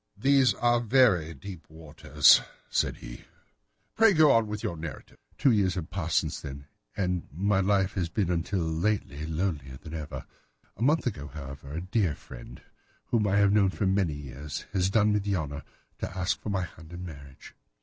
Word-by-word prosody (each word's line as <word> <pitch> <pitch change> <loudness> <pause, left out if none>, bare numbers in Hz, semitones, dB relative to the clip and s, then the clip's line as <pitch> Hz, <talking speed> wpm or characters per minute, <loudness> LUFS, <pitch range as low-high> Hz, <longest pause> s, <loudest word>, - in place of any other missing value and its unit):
"These 135 -1 +4
are 120 +2 +2
very 110 -9 +3
deep 90 +2 -10
waters," 80 -1 +4 0.3
said - - 0
he; - - -10 0.7
"pray 225 -2 +6
go 155 -4 +6
on 115 -1 +3
with 105 0 -5
your 85 - -2
narrative." 80 -3 -9 0.2
"Two 140 - +4
years 95 -5 +2
have 90 -2 -5
passed 85 -5 -1
since - - -1
then, 70 +1 -8 0.3
and 90 -3 -1
my 95 +5 +1
life 95 0 +2
has 90 -4 -2
been 90 -1 0
until 90 +2 -1
lately 80 -2 -1
lonelier 80 -6 -3
than 80 +2 -11
ever. 75 -2 -6 0.5
A - - -13
month 150 +6 +3
ago, 75 - -3
however, 70 -1 -9
a 80 - -3
dear 95 -3 0
friend, - - -12 0.5
whom 110 -3 +2
I 100 - +1
have 100 0 +4
known 100 -2 +4
for 100 - -2
many 95 -4 +1
years, 70 0 -7
has 95 -1 +2
done 105 0 +3
me 105 - +2
the 100 0 -1
honour 75 -3 -4 0.4
to 95 - -5
ask 90 -1 -1
my 95 -3 0
hand 80 -1 -11
in 90 +1 -6
marriage. 70 -5 -11
90 Hz, 180 wpm, -28 LUFS, 80-105 Hz, 0.7 s, pray